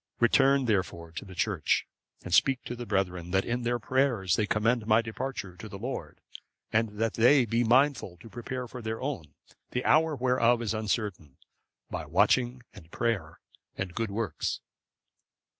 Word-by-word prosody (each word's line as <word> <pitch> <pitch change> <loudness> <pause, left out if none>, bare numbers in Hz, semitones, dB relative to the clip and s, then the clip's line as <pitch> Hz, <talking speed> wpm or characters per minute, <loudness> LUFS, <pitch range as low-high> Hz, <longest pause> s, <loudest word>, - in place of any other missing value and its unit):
Return, 135 +3 +4
therefore, 90 -6 -1
to 85 - -7
the 95 -1 -11
church, 95 -5 +1 0.4
and 90 - -5
speak 135 +6 +4
to 120 - -5
the 120 -1 -7
brethren, 90 -4 -1
that 95 +1 +1
in 125 +1 -1
their 120 0 0
prayers 120 -6 +1
they 105 - 0
commend 110 +2 +1
my 110 0 +5
departure 115 -4 -4
to 105 +5 -9
the 100 - -7
Lord, 110 - -6 0.5
and 110 -1 +1
that 115 0 +1
they 125 +3 +5
be 115 +2 +1
mindful 125 -6 +2
to 90 - -13
prepare 125 +2 -5
for 125 +1 -8
their 110 0 -4
own, 130 - -5 0.3
the 125 - -3
hour 160 0 +4
whereof 120 -2 +3
is 110 - -1
uncertain, 105 - -3 0.5
by - - -4
watching, 125 0 +2
and 80 - -14
prayer, 100 -7 -2 0.4
and 95 -2 -4
good 115 +2 -2
works." 100 -4 -2
115 Hz, 165 wpm, -29 LUFS, 95-125 Hz, 0.5 s, my